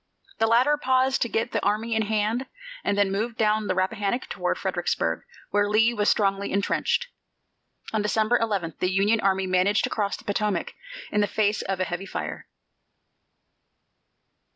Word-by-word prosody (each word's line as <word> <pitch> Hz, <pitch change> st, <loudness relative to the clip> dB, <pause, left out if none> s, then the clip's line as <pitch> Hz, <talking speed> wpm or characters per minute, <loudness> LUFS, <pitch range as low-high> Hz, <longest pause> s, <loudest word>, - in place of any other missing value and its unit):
The 225 Hz, -, +3 dB
latter 250 Hz, +6 st, +4 dB
paused 260 Hz, -1 st, +2 dB
to 235 Hz, -, +1 dB
get 225 Hz, +1 st, -1 dB
the -, -, -1 dB
army 215 Hz, +3 st, 0 dB
in 220 Hz, -, +2 dB
hand 220 Hz, +4 st, 0 dB, 0.4 s
and 200 Hz, -, 0 dB
then 200 Hz, -1 st, +2 dB
moved 220 Hz, +4 st, -2 dB
down 215 Hz, -1 st, +2 dB
the 185 Hz, -, 0 dB
Rappahannock 200 Hz, +5 st, -1 dB
toward -, -, -1 dB
Fredericksburg, -, -, -1 dB, 0.3 s
where 205 Hz, 0 st, +2 dB
Lee 225 Hz, +3 st, +4 dB
was 210 Hz, -2 st, +1 dB
strongly 200 Hz, -1 st, +1 dB
intrenched. 200 Hz, -, 0 dB, 0.9 s
On 215 Hz, -, +1 dB
December 215 Hz, +3 st, +2 dB
11 200 Hz, -8 st, -1 dB
the 180 Hz, -, +1 dB
Union 205 Hz, +4 st, +2 dB
army 190 Hz, -1 st, +1 dB
managed 185 Hz, +3 st, +2 dB
to -, -, -1 dB
cross 205 Hz, -2 st, -1 dB
the -, -, -15 dB
Potomac 205 Hz, -3 st, -1 dB, 0.4 s
in 210 Hz, -, +2 dB
the 205 Hz, -, +2 dB
face 210 Hz, 0 st, +1 dB
of 195 Hz, -1 st, -3 dB
a -, -, +2 dB
heavy 185 Hz, +2 st, -5 dB
fire. -, -, -5 dB
210 Hz, 165 wpm, -25 LUFS, 195-225 Hz, 0.9 s, latter